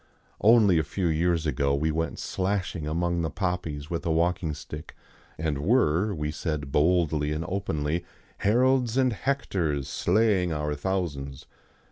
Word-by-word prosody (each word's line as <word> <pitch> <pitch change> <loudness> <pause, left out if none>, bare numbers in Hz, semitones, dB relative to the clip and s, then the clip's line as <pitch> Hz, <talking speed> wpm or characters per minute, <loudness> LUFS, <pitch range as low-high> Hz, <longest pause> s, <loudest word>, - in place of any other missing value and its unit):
Only 105 -6 +6
a - - +1
few 90 +5 -3
years 85 0 +1
ago 70 -1 +1
we 80 +3 0
went 80 +1 -2
slashing 95 -4 -2
among 85 +2 0
the 80 - -1
poppies 85 -5 -3
with 85 - -2
a - - -2
walking 85 -1 +1
stick, 75 +1 -9 0.4
and 75 -3 -1
were, 95 - +2
we 75 -1 -2
said 75 -3 -3
boldly 75 -1 +2
and 75 +2 -2
openly, 85 -4 -2 0.4
Harolds 125 +2 +2
and 130 -2 +3
Hectors 90 - -1
slaying 90 +4 +2
our 75 -1 -1
thousands. 75 -5 -3
85 Hz, 140 wpm, -27 LUFS, 75-95 Hz, 0.4 s, Only